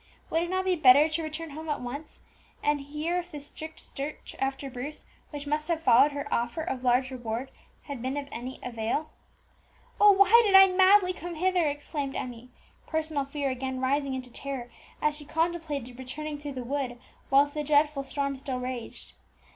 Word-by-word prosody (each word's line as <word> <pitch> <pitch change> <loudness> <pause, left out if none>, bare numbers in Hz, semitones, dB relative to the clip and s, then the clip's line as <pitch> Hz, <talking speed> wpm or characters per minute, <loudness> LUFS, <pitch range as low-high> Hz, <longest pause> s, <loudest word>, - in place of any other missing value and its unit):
Would 325 - +2
it 345 - -2
not 375 +1 0
be 370 -1 +3
better 290 -1 +7
to 320 +1 -2
return 310 0 -5
home 315 +2 -7
at 295 - -1
once, 280 +5 -7 0.5
and 295 -1 +2
hear 305 +5 -2
if 350 0 -7
the 295 - -7
strict 315 +2 -9
search 285 +2 -7
after 270 +1 -2
Bruce 270 +3 -7 0.2
which 290 -1 -6
must 300 +1 -1
have 330 -2 -1
followed 260 +3 +6
her 285 0 -4
offer 240 +7 -1
of 265 -6 -4
large 255 +1 +2
reward 240 +1 -4 0.3
had 280 -5 -6
been 260 +3 -2
of 285 -1 -4
any 250 +3 -6
avail? 240 +6 -2 0.9
"Oh! 415 0 +9
why 400 +4 +7
did 405 -3 +3
I 385 -1 +8
madly 375 0 +6
come 350 -1 -7
hither?" 360 0 +2
exclaimed 290 -1 -3
Emmie, 245 0 -6 0.4
personal 310 -3 -1
fear 280 -1 -2
again 260 0 -3
rising 270 +1 0
into 255 -1 -7
terror, 265 -2 -6 0.3
as 300 0 +2
she 300 - -8
contemplated 300 -5 -2
returning 295 +3 -5
through 290 -1 -6
the 255 -1 -5
wood 255 -1 -2 0.3
whilst 285 +2 +4
the 300 - -2
dreadful 295 -1 +3
storm 280 0 -2
still 265 -1 -4
raged. 250 -2 -6
285 Hz, 185 wpm, -28 LUFS, 260-315 Hz, 0.9 s, Oh